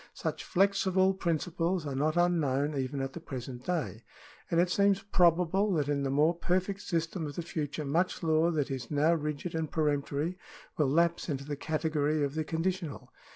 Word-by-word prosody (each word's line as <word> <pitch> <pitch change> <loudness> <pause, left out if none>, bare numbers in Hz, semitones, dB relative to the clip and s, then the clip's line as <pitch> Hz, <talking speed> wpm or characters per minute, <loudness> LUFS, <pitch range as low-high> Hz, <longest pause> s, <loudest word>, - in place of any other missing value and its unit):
Such - - -3
flexible 190 0 +3
principles 170 -1 -1
are 140 - -3
not 155 +5 0
unknown 150 -5 +2
even 135 +1 -2
at 135 0 -3
the - - -6
present 130 -5 -7
day, 155 -10 -2 0.5
and 170 - +2
it 180 +1 +3
seems 200 0 +3
probable 180 +1 +3
that 150 -4 +1
in 145 -1 0
the 135 - -1
more 150 +5 +3
perfect 185 +3 -1
system 165 -3 -2
of 145 - -7
the 170 - -3
future 150 -2 -4
much 170 +6 0
law 160 +1 +3
that 150 -4 -1
is 130 -3 -4
now 150 +3 +3
rigid 150 +1 -3
and 160 -2 -2
peremptory 150 +3 -1 0.4
will 150 -4 +2
lapse 170 +4 +2
into 140 -2 -3
the 145 0 -3
category 155 0 0
of 140 -1 -1
the 155 0 -1
conditional. 165 -1 -3
160 Hz, 180 wpm, -30 LUFS, 145-175 Hz, 0.5 s, flexible